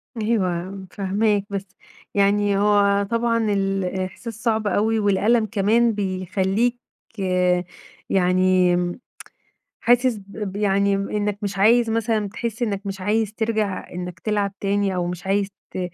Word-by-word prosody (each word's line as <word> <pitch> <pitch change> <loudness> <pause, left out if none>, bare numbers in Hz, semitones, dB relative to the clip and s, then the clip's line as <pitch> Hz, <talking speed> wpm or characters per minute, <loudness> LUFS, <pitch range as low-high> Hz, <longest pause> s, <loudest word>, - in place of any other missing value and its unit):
أيوه 190 -4 -2
فاهماك، 205 +1 0
بس 200 -1 -4 0.5
يعني 200 0 +2
هو 200 -1 +3
طبعًا 230 0 +1
الإحساس 195 +3 -2
صعب 220 -2 +1
أوي، 220 +2 +1
والألم 210 +3 +2
كمان 220 +3 +2
بيخليك 195 +4 0 1.3
يعني 185 -1 +3
امم 175 +4 -1 0.8
حاسس 245 +1 +3
ب 200 0 -7
ب - - -7
يعني 200 -1 +2
إنك 205 +1 -2
مش 200 -1 -3
عايز 225 +3 +4
مثلًا 220 -2 0
تحس 235 +2 -5
إنك 205 -3 -2
مش 195 -1 -5
عايز 210 +2 0
تِرجع 220 -4 -2
إنك 180 -2 -6
تلعب 205 -1 -1
تاني 200 -1 0
أو 180 -1 -1
مش 180 +1 -6
عايز 200 0 +1 0.2
ت - - -6
200 Hz, 130 wpm, -22 LUFS, 195-220 Hz, 1.3 s, عايز